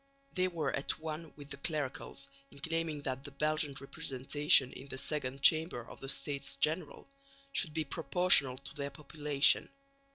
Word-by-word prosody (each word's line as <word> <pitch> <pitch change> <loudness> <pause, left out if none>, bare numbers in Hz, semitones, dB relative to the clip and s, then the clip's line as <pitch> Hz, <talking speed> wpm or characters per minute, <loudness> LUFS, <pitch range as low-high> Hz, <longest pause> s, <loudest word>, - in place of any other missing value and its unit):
They 185 0 +1
were 160 -6 -2
at 135 - -2
one 160 0 -6
with 145 -1 -12
the 140 - -5
clericals 140 -2 -2 0.2
in 140 - -17
claiming 160 0 -3
that 135 -1 -4
the 140 - -7
Belgian 150 0 0
representation 135 +1 +2
in 135 - -10
the 130 - -7
Second 135 -1 -3
Chamber 155 -7 +4
of - - -12
the 135 - -6
States 140 0 -2
General 155 +5 -1 0.4
should 160 - +1
be 160 - 0
proportional 145 -3 +3
to 140 - -5
their 140 -2 -4
population. 145 0 +2
145 Hz, 160 wpm, -33 LUFS, 140-155 Hz, 0.4 s, Chamber